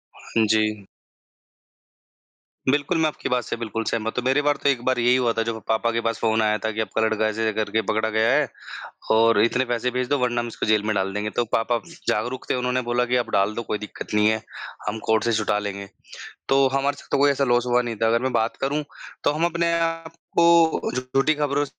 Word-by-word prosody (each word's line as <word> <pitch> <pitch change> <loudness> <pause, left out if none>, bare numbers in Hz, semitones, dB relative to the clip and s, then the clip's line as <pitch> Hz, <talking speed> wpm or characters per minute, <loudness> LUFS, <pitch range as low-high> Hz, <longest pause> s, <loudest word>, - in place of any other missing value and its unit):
हाँ 110 -1 -1
जी। 105 -2 0 1.8
बिल्कुल, 145 +6 +1
मैं 160 -1 +3
आपकी 150 - -4
बात 125 -2 +1
से - - -4
बिल्कुल 115 -1 -3
सहमत 110 -1 -3
हूँ। 125 - 0
मेरे 135 +3 +3
बार 145 0 +1
तो - - +4
एक 125 -4 +1
बार 130 -1 +1
यही 120 +1 +4
हुआ 125 -2 +2
था 115 - 0
जब 110 -1 -4
पापा 110 +1 +1
के 115 0 -1
पास 115 0 -1
फ़ोन 110 0 +1
आया 105 0 +2
था 110 - 0
कि 110 +1 -2
आपका 110 +1 -2
लड़का 110 0 +1
ऐसे 110 +1 -1
करके 110 +1 0
पकड़ा 110 +1 0
गया 110 +2 +2
है 150 0 +3 0.6
और 115 -1 +4
इतने 125 +3 +1
पैसे 120 0 -1
भेज 125 0 -2
दो 145 - +2
वरना 120 -1 0
हम 120 - -5
इसको 115 - -4
जेल 110 -1 +2
में 110 - 0
डाल 95 0 -1
देंगे 105 +1 -2
तो 120 - +2
पापा 115 +1 +1 0.3
जागरुक 120 +5 -2
थे - - +2
उन्होंने 125 0 0
बोला 125 0 +2
कि 125 - 0
आप 120 - -1
डाल 100 +2 +2
दो 115 - -3
कोई 105 - +1
दिक्कत 105 0 -8
नहीं 105 0 +4
है, 110 0 0 0.5
हम 110 +1 -2
कोर्ट 110 -1 +3
से 115 - +1
छुटा 105 -1 +1
लेंगे। 100 -1 -5 0.6
तो 135 0 +4
हमारे 140 +1 0
साथ - - -15
तो - - +2
कोई 140 +1 +4
ऐसा 140 0 0
लॉस 120 -1 +2
हुआ 125 0 +3
नहीं 120 -2 -4
था 115 - +4
अगर 115 +1 +2
मैं 130 0 -1
बात 110 +1 0
करूँ 145 +3 0 0.4
तो - - +3
हम 155 +3 0
अपने 170 0 0
आपको 165 0 +1
झूठी 130 +4 +1
खबरों 145 -1 0
120 Hz, 230 wpm, -23 LUFS, 110-135 Hz, 1.8 s, तो